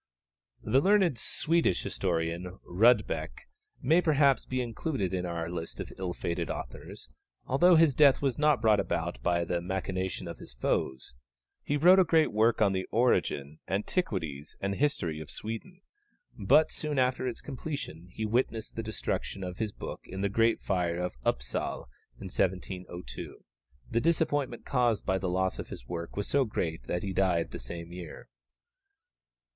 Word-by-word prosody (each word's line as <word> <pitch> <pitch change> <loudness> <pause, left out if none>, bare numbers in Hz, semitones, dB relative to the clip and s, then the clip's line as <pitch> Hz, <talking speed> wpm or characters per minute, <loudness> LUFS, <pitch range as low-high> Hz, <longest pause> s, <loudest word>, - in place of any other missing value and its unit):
The 135 - +3
learned 190 - +3
Swedish 165 - +1
historian 85 0 -2
Rudbeck 95 - +2 0.4
may 160 +7 +5
perhaps 145 -5 +3
be 130 - -2
included 115 - -2
in 90 -1 -1
our 85 -1 -3
list 85 -1 -5
of - - -6
ill 90 -2 -3
fated 85 - -2
authors, - - -7 0.3
although 175 +7 +5
his 160 -3 +5
death 140 -1 +6
was 135 -3 -1
not 150 -6 +4
brought 110 -2 +5
about 85 0 -2
by 85 -1 +1
the 85 +1 -1
machinations 95 0 -3
of - - -7
his - - -11
foes. 65 +1 -1 0.5
He 145 - 0
wrote 180 +6 +7
a - - +7
great 160 -2 +3
work 110 +1 +3
on 100 -2 +3
the 95 0 -2
origin, 80 - +1
antiquities, 90 - -2
and 100 0 -1
history 90 - 0
of 80 -2 -8
Sweden, 115 - -6 0.5
but 155 - +4
soon 150 -2 -3
after 130 0 +1
its 125 - -3
completion 135 - -6
he 110 - -3
witnessed 115 0 -1
the 115 - -2
destruction 110 -3 -3
of 90 0 -6
his 110 -2 -1
book - - -7
in 95 +1 -6
the 100 - +1
great 115 +3 +2
fire 90 -3 0
of 90 -4 -3
Upsal - - -2 0.3
in - - -9
1702. 90 -1 -4 0.5
The 115 - +2
disappointment 145 -6 0
caused 120 -5 +1
by 95 0 +1
the 95 - -2
loss 95 +1 0
of - - -6
his - - -9
work 85 +1 -5
was 100 - -2
so 140 -1 +3
great 80 - -3
that 90 - -2
he 100 -2 -3
died 90 -3 +1
the - - -6
same 85 +7 -7
year. 90 -1 -9
100 Hz, 160 wpm, -30 LUFS, 85-130 Hz, 0.5 s, wrote